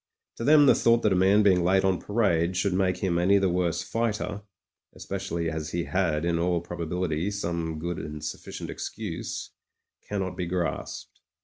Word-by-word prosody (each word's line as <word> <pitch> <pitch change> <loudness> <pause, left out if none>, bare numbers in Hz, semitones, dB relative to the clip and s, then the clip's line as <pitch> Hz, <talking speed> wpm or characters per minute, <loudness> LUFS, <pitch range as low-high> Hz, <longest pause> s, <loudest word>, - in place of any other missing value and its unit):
To - - -4
them 145 +2 +6
the 135 - +7
thought 115 0 +3
that 105 - +3
a - - +2
man 95 +3 +4
being 95 -3 +4
late 95 +2 +3
on 95 -2 +2
parade 95 -5 +1
should 95 +1 +1
make 90 -1 +1
him 85 -3 +1
any 95 +3 +4
the 95 -2 +2
worse 85 -2 0
fighter— 110 -2 -2 0.5
especially 95 -4 -3
as 80 -1 -4
he 85 0 0
had, 85 -5 0
in 85 -1 +1
all 85 0 +1
probability, 85 0 -2
some 85 -5 -3
good 85 +2 -4
and 75 0 -6
sufficient 75 - -6
excuse - - -5 0.3
— - - -39
cannot 95 -3 -2
be 90 -1 -3
grasped. 90 0 -4
90 Hz, 180 wpm, -27 LUFS, 85-100 Hz, 0.5 s, the